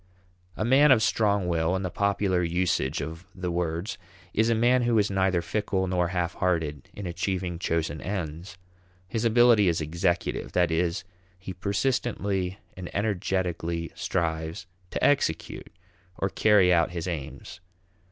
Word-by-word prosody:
A 110 Hz, -, -1 dB
man 135 Hz, +4 st, +6 dB
of 115 Hz, -4 st, +5 dB
strong 100 Hz, -5 st, +2 dB
will, 85 Hz, +1 st, +1 dB
in 95 Hz, -, -2 dB
the 90 Hz, -, -3 dB
popular 100 Hz, -2 st, +1 dB
usage 85 Hz, -5 st, 0 dB
of 80 Hz, +3 st, -8 dB
the 90 Hz, -2 st, -3 dB
words, 85 Hz, +2 st, -2 dB, 0.3 s
is 110 Hz, +2 st, +2 dB
a 115 Hz, -, +3 dB
man 120 Hz, +3 st, +3 dB
who 120 Hz, -1 st, +2 dB
is 105 Hz, -1 st, +2 dB
neither 95 Hz, -2 st, +1 dB
fickle 105 Hz, -3 st, -1 dB
nor 90 Hz, -1 st, +1 dB
half 85 Hz, -1 st, -1 dB
hearted 80 Hz, -6 st, -1 dB
in 100 Hz, -, -6 dB
achieving 90 Hz, 0 st, -2 dB
chosen 80 Hz, -3 st, -1 dB
ends. 90 Hz, -2 st, -5 dB, 0.5 s
His 115 Hz, +4 st, -2 dB
ability 115 Hz, -3 st, +5 dB
is 85 Hz, -2 st, +2 dB
executive; 85 Hz, +2 st, -1 dB
that 90 Hz, -2 st, +2 dB
is, 85 Hz, +1 st, 0 dB, 0.3 s
he 95 Hz, +1 st, -7 dB
persistently 100 Hz, -1 st, -1 dB, 0.2 s
and 90 Hz, -1 st, -7 dB
energetically 90 Hz, -5 st, -1 dB
strives 80 Hz, -1 st, -2 dB, 0.2 s
to -, -, -4 dB
execute 135 Hz, -, 0 dB, 0.5 s
or 95 Hz, -, 0 dB
carry 100 Hz, -3 st, +4 dB
out 85 Hz, -2 st, +3 dB
his 85 Hz, 0 st, -5 dB
aims. 85 Hz, +1 st, -6 dB
90 Hz, 145 wpm, -27 LUFS, 85-100 Hz, 0.5 s, man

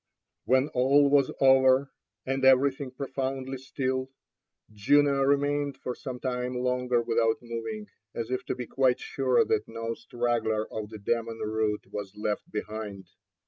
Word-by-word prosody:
When 130 Hz, +3 st, +3 dB
all 140 Hz, +3 st, +4 dB
was 140 Hz, -2 st, +4 dB
over 130 Hz, 0 st, +5 dB, 0.3 s
and 135 Hz, 0 st, -2 dB
everything 135 Hz, +1 st, +4 dB
profoundly 135 Hz, 0 st, -4 dB
still, 130 Hz, -1 st, -2 dB, 0.6 s
Juno 140 Hz, +6 st, +3 dB
remained 145 Hz, 0 st, +1 dB
for 125 Hz, -, -4 dB
some 125 Hz, 0 st, -7 dB
time 125 Hz, -1 st, -2 dB
longer 125 Hz, -1 st, +1 dB
without 115 Hz, -1 st, +2 dB
moving, 120 Hz, -, -5 dB, 0.3 s
as 115 Hz, +1 st, -4 dB
if 130 Hz, -, -1 dB
to -, -, -1 dB
be 125 Hz, -, -5 dB
quite 130 Hz, 0 st, +2 dB
sure 130 Hz, -2 st, +1 dB
that 105 Hz, -, 0 dB
no 115 Hz, 0 st, -4 dB
straggler 115 Hz, -3 st, -1 dB
of 105 Hz, -1 st, -4 dB
the 110 Hz, -, -8 dB
demon 115 Hz, +2 st, -2 dB
rout 110 Hz, -1 st, -1 dB
was 100 Hz, -2 st, -6 dB
left 105 Hz, 0 st, -3 dB
behind. 105 Hz, -2 st, -6 dB
125 Hz, 145 wpm, -28 LUFS, 115-135 Hz, 0.6 s, over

